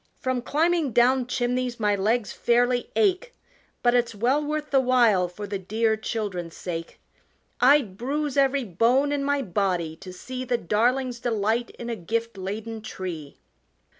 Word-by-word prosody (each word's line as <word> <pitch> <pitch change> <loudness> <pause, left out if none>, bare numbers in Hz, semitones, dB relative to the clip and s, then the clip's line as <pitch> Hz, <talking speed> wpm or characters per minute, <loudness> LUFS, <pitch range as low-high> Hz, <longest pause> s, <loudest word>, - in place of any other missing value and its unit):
From 255 -1 -1
climbing 315 0 +1
down 250 +2 +3
chimneys 250 -1 -1
my 210 -2 +2
legs 215 +2 0
fairly 245 +1 +1
ache, 430 +4 +1 0.5
But 240 0 +4
it's 240 -2 +1
well 255 +8 +1
worth 300 0 -3
the 275 - +5
while 240 -8 +3
for 190 +4 -8
the 200 -1 -4
dear 220 +4 0
children's 205 -6 -4
sake. 165 -2 -6 0.6
I'd 250 -7 +4
bruise 285 +3 -2
every 275 -1 +3
bone 240 +8 +2
in 285 -1 -1
my 285 0 0
body 180 -5 -1
to 190 0 -10
see 255 +8 -6
The 250 -1 0
darlings' 240 +5 0
delight 230 0 0
in 235 - -7
a 235 - -2
gift 230 +4 -3
laden 215 +4 -5
tree!" 175 -8 -7
235 Hz, 155 wpm, -25 LUFS, 205-260 Hz, 0.6 s, the